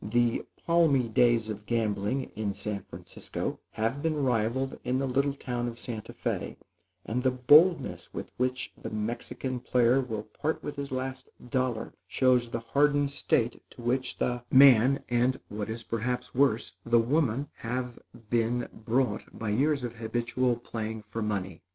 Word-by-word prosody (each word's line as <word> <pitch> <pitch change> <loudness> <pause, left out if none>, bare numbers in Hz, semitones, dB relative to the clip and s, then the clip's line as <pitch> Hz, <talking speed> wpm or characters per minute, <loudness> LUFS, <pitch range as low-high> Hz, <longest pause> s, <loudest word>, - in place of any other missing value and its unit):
The 120 +2 +1 0.2
palmy 160 -7 +4
days 115 0 +3
of 105 -1 -6
gambling, 115 +2 -1
in 105 -2 -2
San 105 -2 -4
Francisco, - - -6
have 115 +6 -1
been 160 0 0
rivaled 130 -1 0
in 125 - 0
the 135 - 0
little 140 +2 +1
town 120 -3 -3
of 115 -1 -6
Santa 115 -4 -6
Fé, - - -3 0.5
and 120 +3 -1
the 130 - +3
boldness 145 +5 +4
with - - -6
which 130 0 -1
the - - -4
Mexican 120 +4 -3
player 125 +2 +3
will 110 -5 -4
part 155 +7 -3
with 145 - -5
his 140 -1 -4
last 130 0 -4 0.2
dollar, 130 -4 -1
shows 125 -2 +3
the 115 0 -3
hardened 145 +4 +2
state 120 -4 0
to 120 - -12
which 130 +2 0
the 125 -1 -1
man, 130 0 +7
and, 125 +2 +2
what 105 +1 -4
is 115 +1 -4
perhaps 125 +2 -3
worse, 130 -4 +2
the 120 0 +3
woman, 135 +2 +1
have 125 +1 -4 0.3
been 120 +1 +1
brought, 115 -1 -1
by 110 - -3
years 140 +5 +2
of 120 -1 -5
habitual 120 +2 0
playing 110 -2 -5
for 110 +2 -5
money. 95 -5 -3
120 Hz, 155 wpm, -29 LUFS, 115-130 Hz, 0.5 s, man